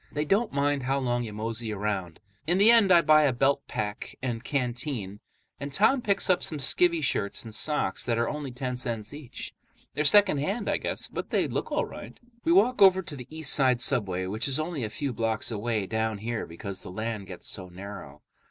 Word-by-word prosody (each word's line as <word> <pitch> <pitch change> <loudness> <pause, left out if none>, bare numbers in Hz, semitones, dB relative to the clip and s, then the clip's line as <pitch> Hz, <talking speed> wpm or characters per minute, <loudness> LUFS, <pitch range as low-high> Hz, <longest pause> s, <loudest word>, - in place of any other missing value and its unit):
They 150 +1 -2
don't 205 +8 +1
mind 140 0 +1
how 135 +2 0
long 120 -2 0
you 110 - -6
mosey 110 +1 -4
around. 100 -5 -3 0.3
In 175 +2 +2
the 210 +4 +7
end 225 -5 +5
I 170 -1 +7
buy 155 -1 +5
a 140 - +3
belt 135 +3 +2
pack 105 -1 -5
and 120 -3 -3
canteen, 125 -6 -3 0.4
and 140 0 -5
Tom 220 - +3
picks 200 -3 +1
up 180 -1 +3
some 155 - -5
skivvy 165 +4 +1
shirts 105 -4 -1
and 110 - -9
socks 150 -5 -1
that 115 -2 0
are 115 0 +1
only 150 -2 -4
ten 125 0 -4
cents 115 -2 -4
each. 145 -4 -8 0.4
They're 150 - 0
secondhand, 195 +3 +3
I - - +1
guess, - - -4
but - - -6
they - - +1
look - - -3
all - - +1
right. - - -10 0.2
We 330 - +2
walk 255 - +4
over 190 -1 +7
to 170 -4 -6
the 125 -3 -9
East 160 -2 +1
Side 130 -3 +3
subway, 100 -8 +1
which 105 +7 -2
is 135 +1 +3
only 155 -4 -3
a 110 - -2
few 135 +4 -3
blocks 115 0 -1
away 110 -1 -1
down 110 +1 -1
here 115 +2 -4
because 95 +3 -6
the - - -9
island 110 0 -4
gets 90 -2 -9
so 95 -2 -3
narrow. 90 -6 -10
125 Hz, 210 wpm, -27 LUFS, 110-155 Hz, 0.4 s, the